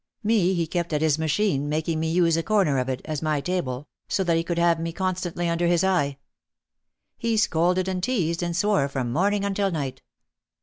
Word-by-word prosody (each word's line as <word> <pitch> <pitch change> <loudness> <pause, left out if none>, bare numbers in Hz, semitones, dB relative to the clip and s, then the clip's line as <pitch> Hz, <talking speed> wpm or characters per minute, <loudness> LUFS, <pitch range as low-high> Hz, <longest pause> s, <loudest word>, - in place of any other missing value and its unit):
Me 205 -4 +2
he 170 -1 0
kept 170 0 -3
at 150 - +1
his 155 -1 +2
machine, 155 -2 0
making 155 +1 -1
me 160 0 -1
use 170 -1 +3
a 165 - +1
corner 185 -9 +2
of 130 +1 -2
it, 130 0 -3
as 155 -2 -3
my 155 -2 0
table, 145 -5 -3 0.2
so 190 - 0
that 170 -2 +2
he 165 - +1
could 170 0 -3
have 170 -1 +3
me 165 0 -3
constantly 175 -1 -2
under 170 +1 +1
his 175 0 +2
eye. 145 -8 +1 1.0
He 230 -1 0
scolded 180 -3 +2
and 185 -1 -2
teased 180 -8 0
and 175 -1 -2
swore 185 -6 +2
from 130 -4 -3
morning 200 +5 +1
until 200 0 0
night. 145 -7 -4
170 Hz, 205 wpm, -25 LUFS, 155-185 Hz, 1.0 s, use